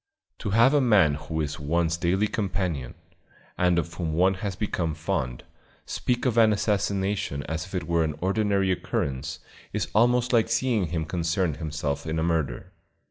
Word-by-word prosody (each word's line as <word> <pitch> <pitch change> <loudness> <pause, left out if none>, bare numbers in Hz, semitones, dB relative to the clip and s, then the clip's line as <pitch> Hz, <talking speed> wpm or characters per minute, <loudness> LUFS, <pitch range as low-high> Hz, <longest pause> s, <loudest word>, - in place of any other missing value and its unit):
To - - -3
have 115 +7 +5
a 145 - +4
man 105 - +5
who 80 +2 -3
is 75 0 -3
one's 80 +3 +1
daily 90 +4 +1
companion, 90 - -2 0.6
and 90 -1 +2
of 85 0 -1
whom 85 -3 -3
one 90 +4 +3
has 95 0 -4
become 85 -6 -2
fond, 65 -6 -2 0.4
speak 125 +1 -1
of 120 -2 +3
an 110 -1 +6
assassination 100 -7 0
as 80 +2 -4
if 95 - -8
it 90 -2 -2
were 85 -1 +2
an 75 -2 -2
ordinary 100 +1 +1
occurrence, 75 -3 -2 0.3
is - - -2
almost 120 +3 +3
like 115 -1 +3
seeing 115 -5 +1
him 80 -1 -2
concerned 85 -1 -1
himself 75 -2 -3
in 80 +1 -1
a 80 - 0
murder. 80 -3 -1
85 Hz, 170 wpm, -26 LUFS, 80-105 Hz, 0.6 s, an